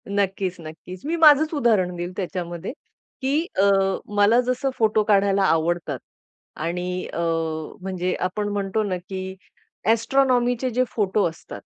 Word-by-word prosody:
नक्कीच, 195 -2 -1
नक्कीच. 165 +3 -10
मी 325 +3 0
माझंच 310 -1 +6
उदाहरण 215 - +2
देईल 175 +1 -4
त्याच्यामध्ये 180 -1 -4 0.5
की 285 +5 +1 0.2
अ, - - +5 0.5
मला 205 +4 +5
जसं 255 +2 -1
फोटो 215 -1 +3
काढायला 200 -1 +3
आवडतात 165 -5 +1 0.6
आणि 180 +3 -3
अ, - - -3 0.6
म्हणजे 185 -1 -2
आपण 185 +3 -2
म्हणतो 200 +1 -1
ना, 190 -3 -2
की 190 +1 -6 0.6
एस्ट्रोनॉमीचे 245 +1 +2
जे 250 +1 +1
फोटो 205 -1 +1
असतात, 160 - -11
200 Hz, 130 wpm, -23 LUFS, 180-240 Hz, 0.6 s, माझंच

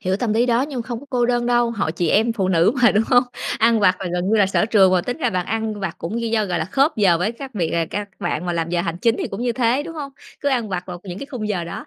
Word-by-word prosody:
hiểu 185 +1 0
tâm 220 0 -1
lý 235 +3 +2
đó 240 0 +2
nhưng 275 -3 -4
mà 230 - -8
không 240 -2 -4
có 285 - -14
cô 245 -2 +1
đơn 240 -1 0
đâu, 240 -1 +2
hội 205 -8 -2
chị 170 0 -1
em 225 +6 +3
phụ 195 -5 -1
nữ 175 +2 +3
mà, 240 - +7
đúng 215 - +2
hông? 245 -2 +5 0.4
Ăn 230 0 +3
vặt 185 -2 +4
là 190 - -3
gần 180 +1 -1
như 220 - +3
là 205 -2 +4
sở 195 +2 +1
trường 195 -5 +4
mà 185 - +3
tính 245 +7 -4
ra 245 -7 0
bạn 180 -3 -2
ăn 220 -1 -2
vặt 190 -4 -3
cũng 215 +8 -4
gi 230 - -2
do, 220 -2 +1
gọi 180 -3 -2
là, - - -1
khớp 280 +3 +1
giờ 190 -6 +4
với 195 +6 -1
các 260 +2 -9
việc 170 -6 -1
à, 165 -1 +1
các 205 0 -4
bạn 175 -2 -2
mà 175 - -1
làm 165 -1 -2
giờ 175 -1 +1
hành 170 -2 -3
chính 230 +4 +2
thì - - -2
cũng 195 - -6
như 245 -1 0
thế, 245 +3 +1
đúng 330 +2 -8
hông? 285 -3 -6 0.3
Cứ 285 - 0
ăn 245 -5 0
vặt 180 -2 -3
vào 180 -1 -7
những 180 -1 -7
cái 275 - -7
khung 245 -7 -5
giờ 185 -5 -2
đó. 170 - -7
220 Hz, 335 wpm, -21 LUFS, 185-240 Hz, 0.4 s, mà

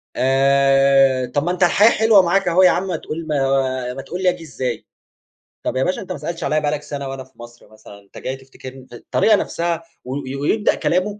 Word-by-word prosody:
آآ، 135 0 +3
طَب 135 +4 -2
ما 175 - -1
أنت 180 +1 0
الحياة 205 +5 +5
حلوة 220 -3 +5
معاك 185 +2 +1
أهو 175 +2 +4
ياعم 185 +1 +3
ما 180 - -2
تقول 160 +1 -6
ما 135 -3 0
ما 135 - -7
تقول 180 +6 -6
لي 185 - +4
آجي 180 -2 -4
إزاي؟ 130 -6 -5 0.8
طَب - - -2
يا 130 - +1
باشا 185 - -2
أنت 190 - -9
ما - - -4
سألتش 165 +3 -6
عليَّ 155 0 0
بقى 145 -1 0
لك 150 -1 -3
سنة 140 -2 -6
وأنا 135 0 -6
في 130 - -24
مصر 120 0 -13
مثلًا 110 -2 -15
أنت 100 -1 -18
جاي 130 - -4
تفتكرني 135 0 -12
د - - -13
الطريقة 215 - +2
نفسها 170 -4 -2 0.2
و 130 - -5 0.3
ويبدأ 205 +9 +1
كلامه 195 +4 -1
145 Hz, 215 wpm, -19 LUFS, 130-175 Hz, 0.8 s, الحياة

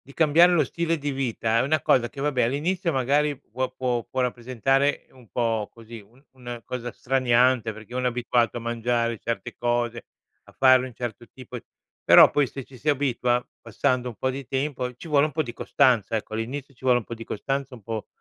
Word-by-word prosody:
di 140 - -13
cambiare 165 +3 +5
lo 165 -3 +4
stile 165 +4 -1
di 145 0 -3
vita 115 -4 -1
è - - +3
una 150 +2 +1
cosa 120 -2 +3
che, 135 - -10
vabbé, 140 -4 +1
all'inizio, 165 +7 -1
magari, 140 +2 +1
può 130 +3 -4
può 120 -3 -1
può 130 +2 -4
rappresentare 130 +3 0
un 125 -4 -19
po' 115 -3 -1
così 115 0 -11
un 115 +7 -22
un 120 -2 -8
cosa 120 -1 -5
straniante, 125 -3 +2
perché 110 +2 -12
uno 125 0 -1
è - - +4
abituato 120 -1 0
a - - -3
mangiare 115 -1 -1
certe 115 0 -4
cose, 120 -1 -1 0.4
a - - -18
fare 130 -1 +5
un 125 - -11
certo 120 0 -6
tipo 125 -1 -9 0.5
però, - - +8
poi, 145 -1 +2
se 135 +2 -7
ci 130 0 -15
si 150 - -4
abitua, 125 -4 +1 0.2
passando 125 +2 -1
un 120 - -7
po' 130 - -1
di 135 0 -6
tempo, 130 -1 -2
ci 125 - -11
vuole 145 -1 +4
un 155 - -8
po' 155 +1 0
di 120 - -7
costanza. 120 -7 +2
Ecco, 110 - -6
all'inizio 135 +5 -5
ci 130 - -20
vuole 125 -1 +4
un 115 - -12
po' 115 - -7
di 115 0 -9
costanza, 135 +4 -3
un 115 - -13
po' 110 +1 -5
125 Hz, 210 wpm, -25 LUFS, 120-140 Hz, 0.5 s, però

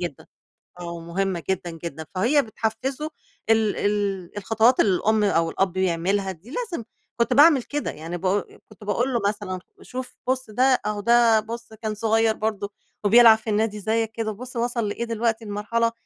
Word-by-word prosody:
جدًا. 175 -6 -5 0.5
آه، 170 -1 -5
ومهمة 170 +1 -3
جدًا، 180 -2 -1
جدًا. 165 -1 -7
فهي 255 +10 +3
بتحفِّزه 245 +6 -3 0.4
ال 220 -2 +3
ال 200 -3 -1
الخطوات 225 +4 +3
اللي 190 -3 +4
الأم 215 +2 +2
أو 165 -4 +2
الأب 190 0 -1
يعملها، 190 +2 0
دي 190 +7 -14
لازم 395 - -3 0.3
كنت 235 - +2
باعمل 290 -3 +6
كده. 295 0 -3
يعني 165 +3 -6
ب 185 - -8 0.4
كنت 215 0 -15
باقول 245 +5 0
له 235 - +2
مثلًا: 205 -3 -3 0.2
"شوف، 255 0 -7
بُص 260 -2 -1
ده، 230 +4 +1 0.2
أهو 210 -1 -1
ده 235 0 +5
بُص 230 +1 -7
كان 215 -1 -4
صغير 225 0 +2
برضه 210 -2 -2 0.3
وبيلعب 225 +1 +8
في 220 - -7
النادي 210 0 0
زيّك 220 +2 0
كده، 225 -1 -3
بُص 250 +5 -9
وصِل 235 -2 -1
لإيه 235 - -3
دلوقتي 230 0 -1
لمرحلة 230 +3 0
220 Hz, 170 wpm, -24 LUFS, 195-235 Hz, 0.5 s, وبيلعب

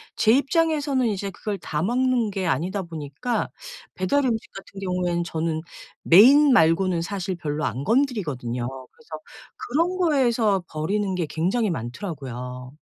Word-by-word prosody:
제 220 - +3
입장에서는 285 -2 +1
이제 200 -2 -3
그걸 205 +2 -4
다 150 -3 -3
먹는 245 +2 +1
게 190 -2 -3
아니다 185 +4 -1
보니까 165 - -4 0.5
배달 275 +10 +1
음식 225 -3 -2
같은 195 0 -11
경우에는 180 -2 -1
저는 160 -1 -2 0.4
메인 265 - +7
말고는 175 -2 +3
사실 185 +1 -3
별로 155 -2 -3
안 125 +4 -3
건드리거든요. 150 - -1 0.2
그래서 470 - -24 0.5
그런 335 +8 -1
거에서 240 - +2
버리는 190 +5 -1
게 175 -2 -1
굉장히 195 +9 0
많더라고요. 125 - -6
190 Hz, 315 characters per minute, -24 LUFS, 160-245 Hz, 0.5 s, 메인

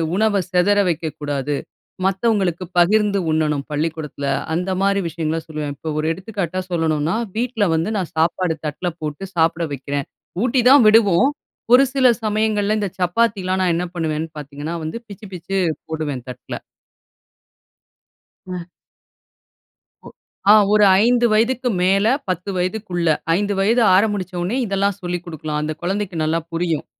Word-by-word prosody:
உணவ 205 -1 +2
சிதற 185 +3 +3
வைக்கக்கூடாது. 145 -3 -3 0.5
மத்தவங்களுக்கு 190 -3 +1
பகிர்ந்து 200 +2 +3
உண்ணணும் 150 -3 0
பள்ளிக்கூடத்துல." 150 -2 -3 0.3
அந்த 180 +3 -2
மாதிரி 200 0 +2
விஷயங்கள்ல 160 0 -2
சொல்லுவேன், 150 -2 -4
இப்ப 155 +2 -4
ஒரு 155 - -1
எடுத்துக்காட்டா 185 -1 -4
சொல்லணும்னா 160 +1 0 0.2
வீட்ல 230 -3 0
வந்து 165 +7 -1
நான் 180 - -4
சாப்பாடு 165 +1 +1
தட்ல 165 +4 -3
போட்டு 155 +5 -4
சாப்பிட 165 +1 +2
வைக்குறேன், 140 +1 -4 0.4
ஊட்டிதான் 255 +1 +5
விடுவோம். 215 +1 +5 0.4
ஒரு 255 +2 +8
சில 265 -2 +4 0.2
சமயங்கள்ல 215 -1 +1
இந்த 205 -2 -1
சப்பாத்திலாம் 190 0 +1
நான் 180 -2 +2
என்ன 180 +1 -2
பண்ணுவேன்னு 160 -1 -2
பாத்தீங்கன்னா 145 +3 -6
வந்து 160 +9 -4
பிச்சு, 205 0 -11
பிச்சு 190 +3 -3 0.3
போடுவேன் 150 -6 -4
தட்ல. 125 - -7 1.8
அ. 180 -2 -6 1.4
ஒ - - -9 0.4
ஆ - - +9 0.2
ஒரு 210 0 +5 0.2
5 240 +1 +3
வயதுக்கு 245 +3 +1
மேல 195 +3 +3 0.2
10 185 +2 -2
வயதுக்குள்ள, 180 -2 -2 0.3
5 205 +1 -1
வயது 225 +5 +3
ஆறமிச்ச 195 -2 +1
உடனே 195 +9 -1
இதெல்லாம் 200 -1 0
சொல்லிக் 175 -1 -3
குடுக்கலாம். 155 -2 -4
அந்த 155 +1 -2
குழந்தைக்கு 190 +1 -2
நல்லா 160 +2 +1
புரியும். 165 -2 -1
180 Hz, 130 wpm, -20 LUFS, 160-205 Hz, 1.8 s, ஆ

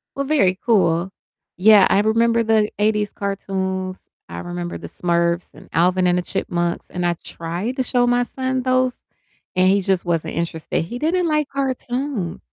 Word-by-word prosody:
Well, 275 - -2
very 195 -11 +2
cool, 190 -5 +2 0.4
yeah, 205 +1 +6
I 195 - +4
remember 230 +2 +2
the 220 -1 +2
'80s 210 0 +1
cartoons, 190 -1 -3 0.2
I 85 0 -7
remember 85 0 -5
The 85 0 -8
Smurfs 170 - -1
and - - -15
Alvin 180 +2 +2
and 180 0 +3
the - - +1
Chipmunks, 175 -1 -2
and 180 -1 -3
I 175 - +2
tried 175 - -4
to 260 - +1
show 245 -1 +2
my 245 0 +2
son 260 0 -2
those, 255 -1 +1 0.6
and 185 0 +4
he 195 +1 +3
just 190 -1 0
wasn't 165 -2 -1
interested, 165 -2 -2
he 240 +9 -6
didn't 345 +3 +1
like 305 -2 +1
cartoons. 260 -7 -3
195 Hz, 165 wpm, -21 LUFS, 175-245 Hz, 0.6 s, yeah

